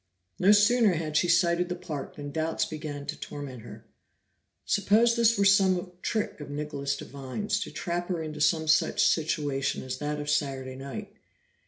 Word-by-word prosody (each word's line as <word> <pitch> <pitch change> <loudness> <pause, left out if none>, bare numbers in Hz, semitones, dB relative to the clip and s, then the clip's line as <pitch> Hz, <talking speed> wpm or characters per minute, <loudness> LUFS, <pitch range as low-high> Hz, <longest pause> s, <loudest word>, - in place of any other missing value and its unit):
No 195 - +5
sooner 210 0 +5
had 155 -2 -3
she 175 - +3
sighted 170 0 +3
the 180 - -2
park 155 -7 -6
than 145 -1 -7
doubts 160 +2 -1
began 150 -2 -6
to 150 +2 -4
torment 135 -5 -7
her. 110 0 -12 0.8
Suppose 220 +4 +3
this 230 -1 +4
were 200 - +3
some 190 -2 +3
trick 215 -8 -2
of 145 - -8
Nicholas 145 -1 -3
Devine's, 140 +12 -4
to 205 - -4
trap 170 +3 -3
her 180 -3 -2
into 155 -1 -5
some 160 +1 +2
such 155 - +3
situation 145 -4 0
as 130 -1 -5
that 150 0 -3
of 145 - -5
Saturday 135 -3 -1
night. 195 +11 -7
155 Hz, 170 wpm, -28 LUFS, 145-190 Hz, 0.8 s, No